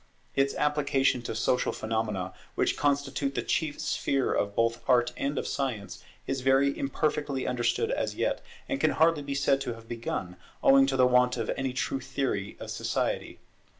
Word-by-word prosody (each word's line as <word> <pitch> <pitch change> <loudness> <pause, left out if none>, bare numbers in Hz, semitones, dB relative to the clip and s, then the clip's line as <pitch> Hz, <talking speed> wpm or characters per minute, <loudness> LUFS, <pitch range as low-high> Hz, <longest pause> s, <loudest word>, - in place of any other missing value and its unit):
Its 135 0 +2
application 140 -4 +2
to 115 - -5
social 125 +3 +1
phenomena, 105 -4 -2 0.2
which - - +1
constitute 140 -1 0
the - - -1
chief 155 -3 -1
sphere 135 -1 0
both 115 +3 0
of - - -24
Art 120 -1 +4
and 140 +1 -2
of - - -1
Science, 125 -8 -3 0.2
is 135 -1 -2
very 135 +2 +3
imperfectly 140 -1 -1
understood 125 - 0
as - - -1
yet, - - 0 0.3
and 275 - -2
can - - +4
hardly 160 -1 +4
be 140 -1 -4
said 135 0 +2
to 120 -3 -3
have 115 0 -14
begun, 105 -6 -4 0.3
owing 135 0 +7
to 135 -1 0
the 130 - +6
want 125 0 +4
of - - -1
any 130 -1 -2
true 130 +1 -2
theory 130 -7 -3
of - - -6
society. - - -2
135 Hz, 175 wpm, -28 LUFS, 120-140 Hz, 0.3 s, owing